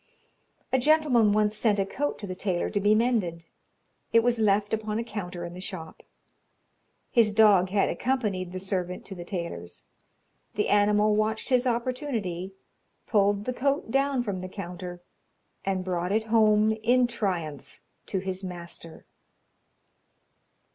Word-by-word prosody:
"A 260 - +4
gentleman 260 -6 +4
once 210 0 +2
sent 215 -1 +2
a 195 - +1
coat 290 +8 -2
to 205 - -7
the 185 - -5
tailor 185 -1 -1
to 205 - 0
be 205 +2 +4
mended 215 -8 0 0.7
it 230 - +6
was 240 0 +1
left 205 -1 +2
upon 215 -1 -1
a 230 - -1
counter 180 -6 -6
in 170 - -7
the 180 - -8
shop. 175 -4 -7 1.1
His 230 -4 +4
dog 205 -4 +5
had 195 +1 +2
accompanied 210 -9 -1
the 185 - -5
servant 185 -1 -3
to 195 - -6
the 175 -2 -7
tailor's. 170 - -6 0.7
The 210 - 0
animal 210 +1 +4
watched 215 +2 0
his 255 -1 +3
opportunity, 235 - -2 0.5
pulled 205 -1 +2
the 255 - -1
coat 275 -1 -1
down 275 -1 +1
from 200 -5 -3
the 185 0 -6
counter, 180 -2 -7 0.6
and 190 -1 -1
brought 180 0 -1
it 220 +2 +2
home 215 -1 +5
in 245 +3 +4
triumph 180 - -4 0.3
to 195 - -1
his 190 0 -4
master. 170 -2 -8
205 Hz, 150 wpm, -27 LUFS, 185-230 Hz, 1.1 s, it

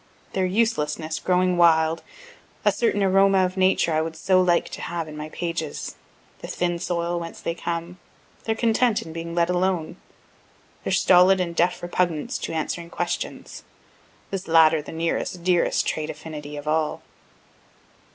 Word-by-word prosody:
their 190 -1 +1
uselessness 160 -7 0
growing 180 0 +2
wild 165 -1 +4 0.6
a 210 - +6
certain 205 -1 +1
aroma 195 0 +4
of 185 +1 -4
Nature 185 -3 +2
I 155 - +2
would 160 0 -4
so 185 +2 +3
like 175 -2 +2
to - - -7
have 170 -2 -4
in 155 - -9
my 150 0 -6
pages 165 -2 -4 0.4
the - - -8
thin 175 -1 -1
soil 170 -1 -1
whence 165 0 -7
they 165 - -2
come 170 +1 -5 0.5
their 220 - 0
content 230 0 +2
in 160 - -9
being 165 0 -5
let 170 -1 +3
alone 180 -2 -1 0.9
their - - -2
stolid 185 +1 +5
and 170 -2 -2
deaf 175 +2 +1
repugnance 175 -3 -1
to - - -4
answering 170 +1 -3
questions, 175 0 -4 0.7
(this 195 -1 -4
latter 160 -1 +5
the - - -10
nearest, 165 +2 -2
dearest 180 -1 +2
trait 155 0 -2
affinity 150 -2 -7
of 145 +1 -8
all.) 155 0 0
170 Hz, 155 wpm, -24 LUFS, 160-185 Hz, 0.9 s, a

